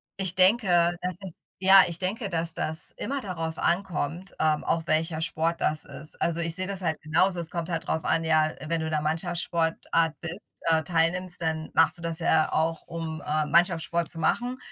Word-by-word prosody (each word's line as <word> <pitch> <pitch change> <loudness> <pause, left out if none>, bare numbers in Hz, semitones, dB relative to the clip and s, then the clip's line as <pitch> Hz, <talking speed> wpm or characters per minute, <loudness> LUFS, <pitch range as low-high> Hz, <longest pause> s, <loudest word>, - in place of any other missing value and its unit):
ich 190 -2 -3
denke, 185 -3 +3
das 180 -1 -3
ist 185 -4 -7 0.2
ja, 190 +1 +8
ich 170 - -5
denke, 200 +3 -3
dass 165 -1 +3
das 160 +1 0
immer 280 +1 -4
darauf 165 -7 -5
ankommt, 175 -1 -2
ähm, 155 -1 +1
auch 165 - -1
welcher 160 +1 0
Sport 160 +1 -1
das 150 0 +2
ist. 155 - -3
Also, 170 0 0
ich 165 -1 0
sehe 185 0 0
das 195 -1 -3
halt 160 -4 -2
genauso, 170 +5 +2
es 165 - +1
kommt 170 -1 -4
halt 165 -2 -3
drauf 160 - -1
an, 165 - +1
ja, 155 -1 +2
wenn 165 0 0
du 160 - -3
in 160 - -4
'ner 155 - 0
Mannschaftssportart 165 0 0
bist 175 +3 -6 0.3
äh, 160 -1 +3
teilnimmst, 175 +3 +1
dann 160 -1 -2
machst 165 +2 +5
du - - -7
das 165 -1 -2
ja 160 -1 +2
auch, 165 +1 0
um, 165 -1 -5
äh, 155 0 -1
Mannschaftssport 170 0 +1
zu 165 - -1
machen, 245 +9 0
165 Hz, 200 wpm, -26 LUFS, 160-180 Hz, 0.3 s, ja